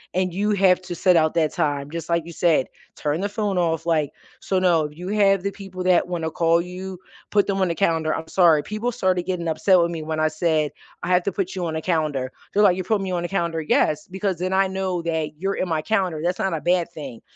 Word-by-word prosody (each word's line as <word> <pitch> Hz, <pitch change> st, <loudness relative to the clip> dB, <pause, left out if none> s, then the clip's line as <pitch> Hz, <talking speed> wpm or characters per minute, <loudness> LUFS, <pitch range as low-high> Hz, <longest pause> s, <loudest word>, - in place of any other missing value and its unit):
and 185 Hz, -1 st, +1 dB
you 205 Hz, +3 st, 0 dB
have 190 Hz, -2 st, +4 dB
to 180 Hz, -1 st, -6 dB
set 180 Hz, 0 st, +3 dB
out 155 Hz, -1 st, +3 dB
that 160 Hz, -2 st, +2 dB
time. 145 Hz, -1 st, -1 dB
Just 165 Hz, 0 st, -6 dB
like 170 Hz, -1 st, +1 dB
you 170 Hz, -, -8 dB
said, 165 Hz, -5 st, +2 dB, 0.3 s
turn 150 Hz, +4 st, -2 dB
the 200 Hz, -, 0 dB
phone 205 Hz, -2 st, -2 dB
off, 165 Hz, -2 st, 0 dB
like 155 Hz, -4 st, +1 dB, 0.3 s
so 190 Hz, -, 0 dB
no, 170 Hz, -4 st, +3 dB
you 175 Hz, +5 st, -9 dB
have 195 Hz, -1 st, +3 dB
the 200 Hz, -, -1 dB
people 195 Hz, -2 st, -9 dB
that 180 Hz, -1 st, +3 dB
wanna 170 Hz, -3 st, -2 dB
call 165 Hz, +1 st, +2 dB
you, 180 Hz, +1 st, -7 dB, 0.3 s
put 205 Hz, -1 st, +3 dB
them 195 Hz, -1 st, 0 dB
on 185 Hz, -, +3 dB
the -, -, 0 dB
calendar. 165 Hz, -4 st, +1 dB
I'm 160 Hz, -, -4 dB
sorry, 165 Hz, -4 st, +4 dB
people 215 Hz, +8 st, -3 dB
started 185 Hz, -7 st, 0 dB
getting 175 Hz, -2 st, -3 dB
upset 180 Hz, +3 st, +3 dB
with 170 Hz, -, +2 dB
me 165 Hz, -2 st, -5 dB
when 155 Hz, 0 st, -3 dB
I 155 Hz, -, +3 dB
said, 155 Hz, -1 st, 0 dB, 0.3 s
"I -, -, -4 dB
have 180 Hz, 0 st, +3 dB
to 200 Hz, -, -1 dB
put 195 Hz, +1 st, -3 dB
you 180 Hz, -2 st, -2 dB
on 160 Hz, -, -3 dB
a 160 Hz, -, -3 dB
calendar." 150 Hz, -7 st, -1 dB, 0.2 s
They're 205 Hz, -, +3 dB
like, 185 Hz, -3 st, +5 dB
"You 185 Hz, -, -2 dB
putting 200 Hz, +1 st, 0 dB
me 185 Hz, -, -3 dB
on 175 Hz, -1 st, -1 dB
a -, -, -1 dB
calendar?" 170 Hz, -3 st, -1 dB
"Yes, 155 Hz, 0 st, +1 dB
because 190 Hz, 0 st, -2 dB
then 185 Hz, +2 st, -2 dB
I 195 Hz, 0 st, +3 dB
know 190 Hz, -2 st, -2 dB
that 160 Hz, -2 st, -2 dB
you're 195 Hz, +1 st, 0 dB
in 185 Hz, -, -2 dB
my 160 Hz, -2 st, 0 dB
calendar, 185 Hz, -7 st, 0 dB
that's 180 Hz, +1 st, 0 dB
not 190 Hz, -2 st, 0 dB
a 160 Hz, -, -2 dB
bad 175 Hz, -1 st, +1 dB
thing." 135 Hz, -8 st, -8 dB
175 Hz, 255 wpm, -23 LUFS, 160-190 Hz, 0.3 s, like